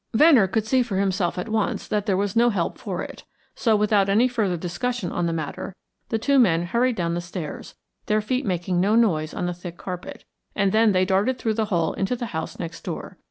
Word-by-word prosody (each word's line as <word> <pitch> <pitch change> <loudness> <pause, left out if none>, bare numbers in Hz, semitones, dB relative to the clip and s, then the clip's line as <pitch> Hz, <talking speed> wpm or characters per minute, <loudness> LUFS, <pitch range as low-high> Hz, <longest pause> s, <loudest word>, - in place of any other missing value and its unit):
Venner 265 -6 +6
could 220 +3 -1
see 255 +3 +3
for 230 -6 -2
himself 190 -3 0
at 180 - -3
once 215 -2 -1
that 210 0 -1
there 190 -2 +2
was 200 -1 -1
no 240 +1 +5
help 190 -7 -2
for - - -4
it, - - -9 0.3
so 225 -3 +2
without 210 -2 +3
any 220 +6 +4
further 215 -8 0
discussion 180 +5 -3
on 175 -1 -1
the - - 0
matter, 165 +3 -5 0.3
the 225 - +1
two 275 +5 +3
men 170 -8 +4
hurried 235 +7 +1
down 170 -4 -1
the 175 - -2
stairs, 170 -3 -7 0.3
their 215 0 +2
feet 250 +5 -1
making 180 -3 -1
no 205 +4 +3
noise 165 -10 +2
on - - -3
the 175 - -1
thick 175 0 -9
carpet, 180 -1 -7 0.3
and 200 -1 +2
then 220 +1 +4
they 185 -1 +3
darted 200 +7 +1
through 220 - -1
the 220 0 0
hole 170 -6 0
into 195 +6 -1
the 240 - -4
house 160 0 -4
next 170 -1 -6
door. - - -6
195 Hz, 225 wpm, -24 LUFS, 175-225 Hz, 0.3 s, Venner